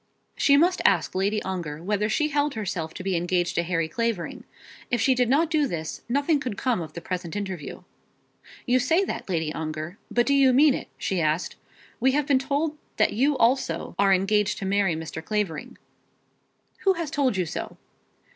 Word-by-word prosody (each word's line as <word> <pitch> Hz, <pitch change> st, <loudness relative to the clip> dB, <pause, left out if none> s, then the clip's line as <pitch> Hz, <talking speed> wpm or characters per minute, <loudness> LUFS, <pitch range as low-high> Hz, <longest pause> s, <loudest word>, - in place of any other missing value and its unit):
She 280 Hz, -1 st, +4 dB
must 355 Hz, +5 st, +3 dB
ask -, -, +3 dB
Lady 200 Hz, +3 st, 0 dB
Ongar 170 Hz, -5 st, -4 dB
whether 210 Hz, +2 st, 0 dB
she 300 Hz, +7 st, +1 dB
held 290 Hz, -1 st, 0 dB
herself 180 Hz, -7 st, -3 dB
to -, -, -6 dB
be 190 Hz, -1 st, 0 dB
engaged 175 Hz, 0 st, 0 dB
to -, -, +1 dB
Harry 165 Hz, -1 st, -1 dB
Clavering. 225 Hz, 0 st, -3 dB, 0.4 s
If 240 Hz, -, +1 dB
she 260 Hz, +4 st, +4 dB
did 250 Hz, -2 st, +1 dB
not 310 Hz, +5 st, +3 dB
do 300 Hz, -3 st, +2 dB
this, 160 Hz, -7 st, -5 dB
nothing 285 Hz, +4 st, +2 dB
could 250 Hz, -7 st, -4 dB
come 245 Hz, -8 st, 0 dB
of 155 Hz, -2 st, -7 dB
the 170 Hz, -, -7 dB
present 180 Hz, -2 st, -4 dB
interview. 190 Hz, -7 st, -5 dB, 0.8 s
"You 255 Hz, 0 st, +3 dB
say 320 Hz, +10 st, +2 dB
that, 375 Hz, -, -5 dB
Lady 160 Hz, -4 st, -1 dB
Ongar, 155 Hz, +3 st, -5 dB
but 240 Hz, 0 st, +2 dB
do 280 Hz, -, +2 dB
you 270 Hz, -2 st, +5 dB
mean 285 Hz, +2 st, +6 dB
it?" -, -, -5 dB
she 185 Hz, -3 st, -1 dB
asked. 155 Hz, +2 st, 0 dB, 0.4 s
"We 260 Hz, +2 st, +3 dB
have 295 Hz, 0 st, +1 dB
been 275 Hz, -2 st, +3 dB
told 295 Hz, +3 st, -1 dB, 0.2 s
that 215 Hz, -, +3 dB
you 275 Hz, +5 st, +2 dB
also 230 Hz, -9 st, +1 dB
are 200 Hz, -1 st, +4 dB
engaged 195 Hz, +2 st, +2 dB
to 195 Hz, -, -5 dB
marry 195 Hz, -3 st, +2 dB
Mr. 160 Hz, 0 st, -6 dB
Clavering." 205 Hz, -6 st, -3 dB, 1.0 s
"Who 390 Hz, -, +3 dB
has 335 Hz, -5 st, -4 dB
told 265 Hz, -8 st, +1 dB
you 180 Hz, -, +1 dB
so?" -, -, -6 dB
210 Hz, 190 wpm, -25 LUFS, 175-275 Hz, 1.0 s, mean